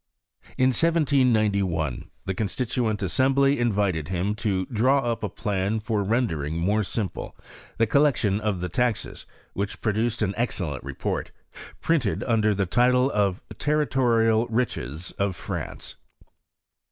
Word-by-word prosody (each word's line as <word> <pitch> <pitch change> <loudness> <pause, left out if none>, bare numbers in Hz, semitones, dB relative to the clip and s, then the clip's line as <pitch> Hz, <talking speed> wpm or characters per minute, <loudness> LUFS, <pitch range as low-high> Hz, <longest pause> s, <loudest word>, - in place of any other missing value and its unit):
In 130 0 +4
1791 110 - +1 0.2
the 95 - -1
Constituent 110 +1 -1
Assembly 135 +8 +3
invited 100 -9 +1
him 95 +3 -1
to 100 -4 -1
draw 130 +6 +2
up 120 -2 -2
a 105 - -1
plan 100 +1 -1
for 105 -1 -1
rendering 90 - 0
more 100 +6 +1
simple 105 0 -4 0.4
the 115 - +4
collection 120 -6 +2
of 105 -4 -1
the 90 - -1
taxes, 120 +5 -2 0.3
which 100 +1 -3
produced 110 +1 0
an 100 -1 0
ex 120 -1 -1
cellent 75 -7 -3
report, - - -3 0.5
printed 145 -12 +1
under 110 -3 +2
the 100 0 +1
title 125 +6 +3
of 100 -2 0
" - - -12
Territorial 120 -6 +2
Riches 90 - -2
of 100 -2 0
France." - - -6
110 Hz, 130 wpm, -25 LUFS, 95-125 Hz, 0.5 s, In